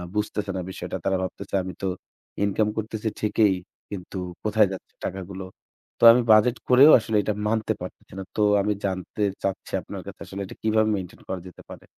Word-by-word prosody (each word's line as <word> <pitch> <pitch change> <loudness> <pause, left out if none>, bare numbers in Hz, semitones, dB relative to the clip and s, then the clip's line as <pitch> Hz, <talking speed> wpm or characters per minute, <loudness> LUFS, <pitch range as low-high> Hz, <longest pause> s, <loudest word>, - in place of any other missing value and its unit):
বুঝতেছে 105 -1 -1
না - - -2
বিষয়টা। 95 - -6
তারা 95 -1 +2
ভাবতেছে 100 +1 -5
আমি 95 0 -6
তো 95 - -1 0.6
ইনকাম 100 +1 +2
করতেছি 110 0 -3
ঠিকই। 105 -2 +3 0.3
কিন্তু 95 -1 -7 0.3
কোথায় 110 -1 +4
যাচ্ছে 95 - -8
টাকাগুলো। 95 0 -5 0.5
তো - - -4
আমি 120 +2 +4
বাজেট 110 +3 +5
করেও 135 +5 +8
আসলে 110 0 -3
এটা 105 - 0
মানতে 110 0 +1
পারতেছি - - -9
না। - - -4
তো - - 0 0.2
আমি 105 +1 +1
জানতে 95 +2 -3 0.2
চাচ্ছি 95 -1 -3
আপনার - - -7
কাছে - - -9
আসলে 100 +1 -6
এটা - - -10
কিভাবে 110 0 +3
মেইনটেইন 95 -3 -7
করা 95 - -3
যেতে 90 - -13
পারে। - - -11
105 Hz, 180 wpm, -25 LUFS, 95-110 Hz, 0.6 s, করেও